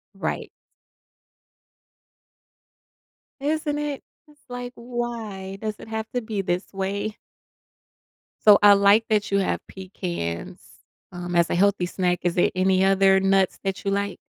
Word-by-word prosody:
Right. - - -3 2.9
Isn't 295 +1 -1
it? 295 -2 -4 0.2
It's 295 -1 -23
like, 245 0 -6
"Why 230 -5 -5
does 215 -1 -3
it - - -11
have 220 0 -4
to 245 - 0
be 215 -3 -3
this 180 +1 -3
way?" 200 +3 -3 1.3
So, 210 -1 +9
I 205 0 +9
like 200 +3 +5
that 210 -2 +1
you 200 - +3
have 195 - 0
pecans, 175 - -5 0.5
um, 175 0 -5
as 170 -1 +3
a - - 0
healthy 195 -1 +2
snack. 180 0 -1
Is 175 -1 0
there 175 - +3
any 185 0 +3
other 195 0 +4
nuts 195 -1 +2
that 195 -1 -3
you 195 - -1
like? 200 0 -1
200 Hz, 140 wpm, -24 LUFS, 190-220 Hz, 2.9 s, So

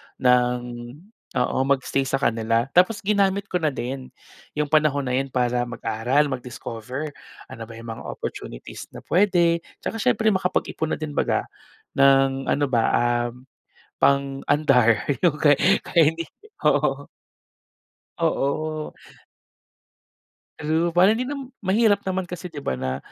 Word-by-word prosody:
ng 125 -1 +3 0.8
oo, 125 - 0
mag-stay 135 0 +1
sa 135 - 0
kanila. 115 0 0
Tapos 190 +4 +3
ginamit 200 -1 +1
ko 180 - +1
na 155 - +1
din, 130 -1 -4 0.5
yung 150 0 -1
panahon 150 -2 +3
na 125 - -3
yun 135 +2 0
para 125 -1 0
mag-aral, 125 +5 0
mag-discover. 125 +3 -6 0.4
Ano 115 -4 -8
ba 115 - -10
yung 115 0 -8
mga 110 - -7
opportunities - - -7
na - - -9
puwede, 175 -3 +3 0.2
tsaka 225 - -3
siyempre 220 +1 +2
makapag-ipon 180 -4 -1
na - - -10
din 155 -1 -5
'baga, - - 0 0.6
ng 135 -1 +4
ano 145 0 +2
ba, 115 -2 +3
ah, 120 0 +1 0.7
pang-andar 140 -4 +3 0.2
yung 170 -5 +4
kay 145 -2 +4 0.2
kaya 165 -3 +4
hindi, 165 0 -5 0.4
oo. - - +2 1.1
Oo. 155 -1 -1 1.7
True. 160 +3 +1
Para 180 +5 +5
hindi 230 - -2
nam 275 -2 -6
mahirap 205 +1 +3
naman 190 -1 -2
kasi 180 0 -7
'di 145 -3 -9
ba - - 0
na, 65 0 -3
140 Hz, 130 wpm, -23 LUFS, 125-175 Hz, 1.7 s, Para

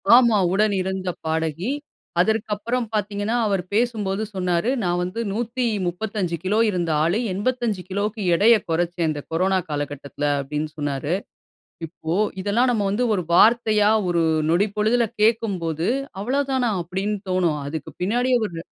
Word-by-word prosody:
ஆமா. 235 -3 +5 0.2
உடன் 210 +1 +2
இருந்த 190 0 -3 0.2
பாடகி. 160 - -1 0.5
அதற்கு 220 +3 +1
அப்புறம் 235 +3 -2
பாத்தீர்கனா, 205 +1 -1
அவர் 195 -3 +1
பேசும்போது 215 -3 0
சொன்னாரு, 180 +2 0
நான் 175 -1 0
வந்து 185 +6 -4
135 215 -5 -2
கிலோ 195 +3 +1
இருந்த 175 -4 -1
ஆளு, 175 +7 +1
85 220 -1 -1
கிலோக்கு 205 +3 -2
எடைய 225 +6 +6
கொறச்சேன், 170 0 0
இந்த 145 -1 -4
கொரோனா 185 +3 +2
காலகட்டத்தில. 145 -1 -4 0.2
அப்படின்னு 150 +3 -3
சொன்னாரு. 145 +1 -2 0.7
இப்போ, 160 0 -5 0.3
இதெல்லாம் 220 +6 +2
நம்ம 215 -4 0
வந்து, 235 +5 +1
ஒரு 180 - -1
வார்த்தையா, 215 0 +5 0.2
ஒரு 170 -1 +2 0.3
நொடிப்பொழுதில 210 +6 +2
கேட்கும்போது, 190 -8 +1 0.3
அவ்வளோ 260 +7 +1
தானா! 255 -3 +1
அப்படின்னு 190 +5 -2
தோனும். 175 -5 +1
அதுக்கு 150 0 -5
பின்னாடி 245 +7 +1
ஒரு, 175 -5 -6
195 Hz, 130 wpm, -23 LUFS, 170-220 Hz, 0.7 s, எடைய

